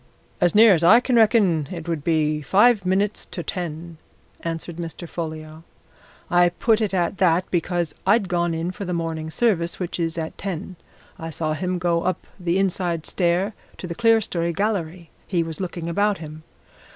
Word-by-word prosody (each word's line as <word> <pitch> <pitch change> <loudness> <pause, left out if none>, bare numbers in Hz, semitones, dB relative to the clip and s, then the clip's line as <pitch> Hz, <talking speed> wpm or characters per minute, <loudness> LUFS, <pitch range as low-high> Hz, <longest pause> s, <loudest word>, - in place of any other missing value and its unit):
"As 175 +1 +3
near 220 -1 +8
as 170 -2 +2
I 215 +8 +8
can 250 0 0
reckon, 205 - +4
it 170 -2 -7
would 165 -4 -2
be 155 -2 +1
five 205 - +4
minutes 200 +3 0
to 175 - -6
ten," 170 -1 -5 0.4
answered 165 0 -5
Mr. 170 0 -6
Folliot. 155 -1 -6 0.7
"I 175 0 +4
put 220 +6 +1
it 215 - 0
at 180 0 -1
that 180 -1 +3
because 175 -2 -1
I'd 200 +1 +3
gone 175 -1 0
in 165 +2 -2
for 200 - -7
the 180 -2 -3
morning 160 -1 -3
service, 170 -3 0
which 180 -1 -4
is 165 -1 -2
at 160 -1 -5
ten. 185 -1 -5 0.4
I 165 -1 -5
saw 155 -1 -2
him 180 +3 -2
go 170 -1 +1
up 185 0 -2
the 175 0 0
inside 180 -4 -1
stair 180 +3 0 0.2
to - - -7
the 170 - -4
clerestory 200 -6 +1
gallery 180 -4 -2 0.2
he 175 -3 +1
was 165 -1 -7
looking 175 -2 -4
about 205 +4 +1
him. 155 -1 -9
175 Hz, 175 wpm, -23 LUFS, 165-190 Hz, 0.7 s, near